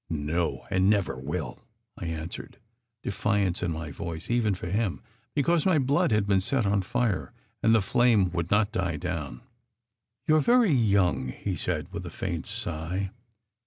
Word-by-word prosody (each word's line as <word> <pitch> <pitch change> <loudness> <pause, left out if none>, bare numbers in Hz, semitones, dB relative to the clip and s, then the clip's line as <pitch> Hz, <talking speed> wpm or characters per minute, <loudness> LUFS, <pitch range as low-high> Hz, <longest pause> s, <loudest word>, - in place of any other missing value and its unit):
"No, 80 +2 -1
and 95 +1 +3
never 100 -8 +2
will!" 75 +1 -4 0.4
I 85 - -6
answered, 80 +1 -6 0.5
defiance 100 -2 0
in 90 - 0
my 80 -1 -5
voice 80 +6 -5
even 115 -5 +2
for 90 - -7
him, 100 +1 -1 0.3
because 155 +2 +2
my 185 -4 +4
blood 140 +1 +2
had 105 -2 +3
been 100 -2 +3
set 120 +3 0
on 100 0 +2
fire 115 +1 -1 0.3
and 110 +1 +5
the 110 - +3
flame 110 -4 +3
would 85 -1 -2
not 105 0 +3
die 90 -7 -1
down. 70 -5 -4 0.8
"You 155 - +5
re - - +4
very 235 - +4
young!" 100 - +2
he 65 - -3
said, - - -3
with - - -4
a - - -5
faint - - -4
sigh. 90 +5 -3
95 Hz, 165 wpm, -27 LUFS, 85-115 Hz, 0.8 s, and